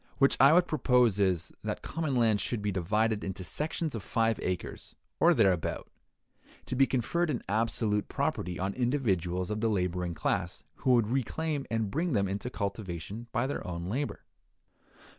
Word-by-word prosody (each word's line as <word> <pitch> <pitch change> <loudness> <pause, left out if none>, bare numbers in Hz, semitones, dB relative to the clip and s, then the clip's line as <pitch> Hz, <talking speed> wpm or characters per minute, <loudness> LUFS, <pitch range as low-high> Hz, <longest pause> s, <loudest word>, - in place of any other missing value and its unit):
What 135 - +5
I 135 +2 +8
would 175 +2 +5
propose 125 - +3
is, 90 -4 +1
that - - -3
common 155 -4 -2
land 110 -4 +3
should 105 +2 -2
be 105 - 0
divided 105 +4 0
into 95 -1 -4
sections 155 - -2
of 115 - -4
five 115 +3 +1
acres 90 -1 -4 0.2
or - - +5
thereabout, 90 -4 +1 0.7
to - - -3
be 135 +1 +4
conferred 155 +7 0
in 130 -6 -2
absolute 105 0 0
property 90 0 -2
on 95 +2 -2
individuals 95 - 0
of 105 0 -2
the 115 - +2
laboring 90 -3 -1
class - - -2
who 130 - +2
would 120 -3 +4
reclaim 140 +4 -1
and 110 -3 -1
bring 165 - 0
them 100 -3 +2
into 100 +5 -3
cultivation 100 0 -5
by 120 0 0
their 140 - -3
own 85 0 -4
labor. 135 +7 -2
110 Hz, 165 wpm, -30 LUFS, 95-130 Hz, 0.7 s, I